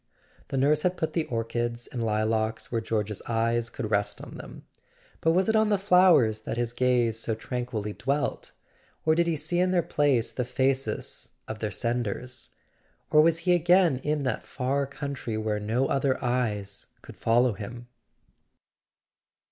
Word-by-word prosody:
The 135 - -3
nurse 145 +3 +3
had 180 +1 0
put 160 - -2
the 165 -2 0
orchids 120 +1 -3
and 120 -3 -4
lilacs 110 0 0
where 115 -2 0
George's 105 -2 -2
eyes 115 0 0
could 115 -4 -5
rest 100 -1 0
on - - -10
them. - - -10 0.5
But 160 - +2
was 185 +3 +2
it 220 - +2
on 220 0 +4
the 205 - +3
flowers 180 - +5
that 110 - -5
his 120 0 -1
gaze 120 -3 +2
so 115 -1 -1
tranquilly 110 -2 -4
dwelt? 140 +6 -2 0.5
Or 155 - +5
did 170 +1 +2
he 165 - +1
see 160 +4 -1
in 180 +1 +3
their 180 -2 +2
place 140 -7 +1
the 125 - -2
faces 130 +2 -1 0.2
of 110 0 -6
their 110 - -2
senders? 120 +2 -3 0.6
Or 150 0 +7
was 165 +1 +4
he 180 - +5
again 175 -4 +4
in 150 +1 -1
that 130 - -1
far 135 +2 -1
coun¬ 140 +1 -5
try 115 -5 -4
whither 110 -1 -1
no 115 +5 0
other 135 -1 +1
eyes 105 -5 -2 0.2
could - - -11
follow 120 +1 +3
him? 120 +4 -8
125 Hz, 170 wpm, -27 LUFS, 115-150 Hz, 0.6 s, Or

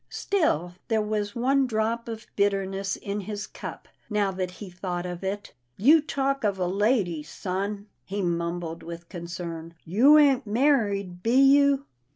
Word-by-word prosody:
Still 180 - 0
there 225 -1 +2
was 210 0 -2
one 265 +3 +2
drop 230 +1 -1
of 225 0 -6
bitterness 195 -1 0
in 200 0 -4
his 205 +1 -5
cup, - - -9 0.2
now 205 -2 +1
that 185 -1 -3
he 195 +3 -9
thought 180 -1 -4
of 180 0 -6
it. 200 +2 -4
" 120 +1 -47
You 315 +2 +8
talk 275 -3 -1
of 200 -2 +1
a 185 - 0
lady, 195 -3 +1
son," 195 +6 -4 0.2
he 200 +1 -3
mumbled 170 -1 -2
with 170 0 -9
concern. 170 -2 -6
" - - -40
You 280 +7 +8
ain't 275 -5 +4
married, 205 -7 +1
be 230 +5 +1
you? 280 0 +5
200 Hz, 165 wpm, -26 LUFS, 180-235 Hz, 0.2 s, You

